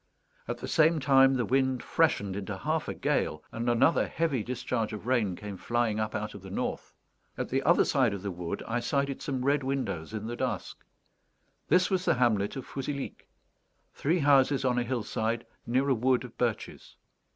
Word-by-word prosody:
At -, -, -3 dB
the -, -, -6 dB
same 160 Hz, +1 st, +4 dB
time, 135 Hz, -1 st, +5 dB
the 125 Hz, -2 st, 0 dB
wind 130 Hz, -1 st, +1 dB
freshened 100 Hz, -12 st, +1 dB
into 100 Hz, -1 st, -4 dB
half -, -, -1 dB
a -, -, -2 dB
gale, 75 Hz, 0 st, -1 dB
and 115 Hz, +1 st, -2 dB
another 120 Hz, +7 st, +3 dB
heavy 160 Hz, -7 st, 0 dB
discharge 115 Hz, -1 st, -2 dB
of 105 Hz, 0 st, -7 dB
rain 115 Hz, -7 st, +1 dB
came 100 Hz, +1 st, -7 dB
flying 120 Hz, -1 st, 0 dB
up 110 Hz, 0 st, -2 dB
out 105 Hz, +1 st, -3 dB
of 100 Hz, -, -10 dB
the 95 Hz, -, -10 dB
north. 95 Hz, -, -4 dB, 0.4 s
At -, -, -3 dB
the -, -, +1 dB
other -, -, +4 dB
side -, -, +2 dB
of 100 Hz, -1 st, -5 dB
the 100 Hz, -, -2 dB
wood 85 Hz, -1 st, -5 dB
I 120 Hz, +2 st, 0 dB
sighted 140 Hz, +3 st, -1 dB
some 130 Hz, -3 st, -3 dB
red 145 Hz, +1 st, +3 dB
windows 130 Hz, -12 st, -3 dB
in 110 Hz, -1 st, -5 dB
the 120 Hz, +1 st, -4 dB
dusk. -, -, -4 dB, 0.8 s
This 180 Hz, +2 st, +3 dB
was 185 Hz, -1 st, +1 dB
the -, -, +3 dB
hamlet 110 Hz, -5 st, +1 dB
of 135 Hz, -, -6 dB
Fouzilhic; 140 Hz, 0 st, -5 dB, 0.6 s
three 160 Hz, +6 st, +1 dB
houses 140 Hz, -2 st, +4 dB
on 125 Hz, -1 st, +2 dB
a -, -, 0 dB
hillside, 115 Hz, -1 st, -2 dB, 0.2 s
near 130 Hz, +4 st, +1 dB
a 135 Hz, -, +4 dB
wood 125 Hz, +1 st, +2 dB
of 125 Hz, -2 st, -10 dB
birches. 120 Hz, -3 st, -3 dB
125 Hz, 190 wpm, -29 LUFS, 110-135 Hz, 0.8 s, time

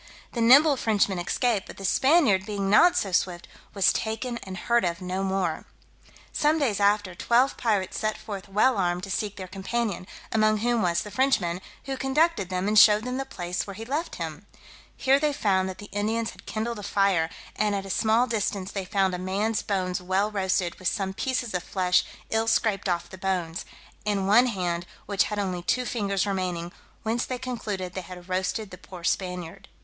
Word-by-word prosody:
The 235 Hz, -, -2 dB
nimble 275 Hz, +5 st, +7 dB
Frenchman 205 Hz, -5 st, +1 dB
escaped; 210 Hz, +3 st, 0 dB
but -, -, -11 dB
the 195 Hz, -, -6 dB
Spaniard 260 Hz, -, +4 dB
being 200 Hz, -2 st, -2 dB
not 350 Hz, +12 st, +6 dB
so 195 Hz, -, 0 dB
swift, 180 Hz, -1 st, 0 dB, 0.3 s
was 195 Hz, -, +4 dB
taken 235 Hz, +2 st, -3 dB
and 190 Hz, -3 st, -8 dB
heard 235 Hz, +5 st, +2 dB
of 170 Hz, -1 st, -1 dB
no 185 Hz, +1 st, -3 dB
more. 190 Hz, -4 st, -1 dB, 0.7 s
Some 300 Hz, +2 st, +2 dB
days 245 Hz, -10 st, 0 dB
after, 205 Hz, -2 st, +2 dB
twelve 240 Hz, +8 st, +2 dB
pirates 205 Hz, -5 st, 0 dB
set 215 Hz, 0 st, -1 dB
forth 200 Hz, -2 st, -7 dB
well 210 Hz, +3 st, +3 dB
armed 175 Hz, -1 st, 0 dB
to 195 Hz, -, -5 dB
seek 205 Hz, +1 st, -2 dB
their 185 Hz, -1 st, -7 dB
companion, 195 Hz, 0 st, -3 dB, 0.2 s
among 215 Hz, -1 st, +3 dB
whom 235 Hz, +1 st, +1 dB
was 170 Hz, -1 st, +1 dB
the 210 Hz, -, -9 dB
Frenchman, 200 Hz, -8 st, +1 dB, 0.2 s
who 270 Hz, -1 st, -4 dB
conducted 270 Hz, -, +1 dB
them, 185 Hz, +1 st, -1 dB
and 210 Hz, 0 st, +5 dB
showed 210 Hz, 0 st, +7 dB
them 250 Hz, +1 st, -3 dB
the 270 Hz, -, -2 dB
place 175 Hz, -6 st, -4 dB
where 200 Hz, -, -7 dB
he 225 Hz, +2 st, -7 dB
left 295 Hz, +7 st, -3 dB
him; -, -, -6 dB, 0.5 s
here 270 Hz, +1 st, +4 dB
they 300 Hz, 0 st, +2 dB
found 190 Hz, -8 st, +1 dB
that 185 Hz, -, -7 dB
the 205 Hz, -, -9 dB
Indians 220 Hz, +3 st, -1 dB
had -, -, -17 dB
kindled 225 Hz, +1 st, -3 dB
a -, -, -6 dB
fire, 195 Hz, -5 st, +2 dB, 0.3 s
and 210 Hz, -1 st, +1 dB
at 195 Hz, -1 st, -3 dB
a 195 Hz, -, -5 dB
small 225 Hz, +5 st, +3 dB
distance 205 Hz, -4 st, -2 dB
they 195 Hz, -2 st, -4 dB
found 195 Hz, -1 st, +1 dB
a 180 Hz, -, -3 dB
man's 200 Hz, +4 st, -1 dB
bones 185 Hz, -3 st, -1 dB
well 190 Hz, +3 st, 0 dB
roasted, 190 Hz, -3 st, 0 dB
with 185 Hz, -, -2 dB
some 190 Hz, +1 st, -1 dB
pieces 245 Hz, 0 st, -2 dB
of 180 Hz, -, 0 dB
flesh 180 Hz, 0 st, +2 dB, 0.3 s
ill 225 Hz, 0 st, +1 dB
scraped 215 Hz, -3 st, +1 dB
off 175 Hz, -1 st, -1 dB
the 190 Hz, -, -11 dB
bones, 180 Hz, -3 st, -2 dB, 0.4 s
and 200 Hz, -2 st, 0 dB
one 235 Hz, +5 st, +6 dB
hand, 175 Hz, -5 st, -2 dB, 0.2 s
which 200 Hz, -1 st, +2 dB
had 210 Hz, -, -4 dB
only 185 Hz, -3 st, -2 dB
two 250 Hz, +8 st, 0 dB
fingers 200 Hz, -5 st, -1 dB
remaining, 180 Hz, -3 st, -2 dB, 0.3 s
whence 230 Hz, +2 st, 0 dB
they 255 Hz, -, -3 dB
concluded 215 Hz, -8 st, -4 dB
they 185 Hz, -, -4 dB
had 180 Hz, 0 st, -11 dB
roasted 190 Hz, +3 st, -2 dB
the 180 Hz, -, -10 dB
poor 185 Hz, -1 st, -11 dB
Spaniard. 180 Hz, +1 st, -3 dB
200 Hz, 195 wpm, -26 LUFS, 185-225 Hz, 0.7 s, nimble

